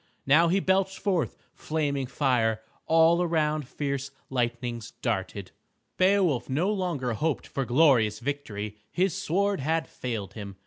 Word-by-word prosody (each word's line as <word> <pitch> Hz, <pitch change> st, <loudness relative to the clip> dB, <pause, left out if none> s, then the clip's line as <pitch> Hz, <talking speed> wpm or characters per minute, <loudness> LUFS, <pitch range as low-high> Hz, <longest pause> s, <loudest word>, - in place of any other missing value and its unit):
Now 155 Hz, +5 st, +5 dB
he 185 Hz, +4 st, +2 dB
belched 190 Hz, 0 st, +1 dB
forth 175 Hz, -, -1 dB, 0.2 s
flaming 145 Hz, -4 st, -2 dB
fire. 120 Hz, -5 st, +1 dB, 0.3 s
All 165 Hz, +2 st, +5 dB
around 155 Hz, -4 st, 0 dB
fierce 140 Hz, -1 st, -3 dB, 0.2 s
lightnings 120 Hz, -2 st, -2 dB
darted. 100 Hz, -4 st, -3 dB, 0.5 s
Beowulf 185 Hz, -9 st, +2 dB
no 165 Hz, +10 st, +1 dB
longer 165 Hz, -, -2 dB
hoped 150 Hz, +6 st, -1 dB
for 135 Hz, -, -3 dB
glorious 120 Hz, -6 st, +4 dB
victory. 110 Hz, -6 st, -4 dB
His 185 Hz, -1 st, +1 dB
sword 200 Hz, +6 st, 0 dB
had 160 Hz, +4 st, 0 dB
failed 110 Hz, -7 st, -5 dB
him. 100 Hz, -3 st, -8 dB
140 Hz, 130 wpm, -27 LUFS, 120-165 Hz, 0.5 s, Now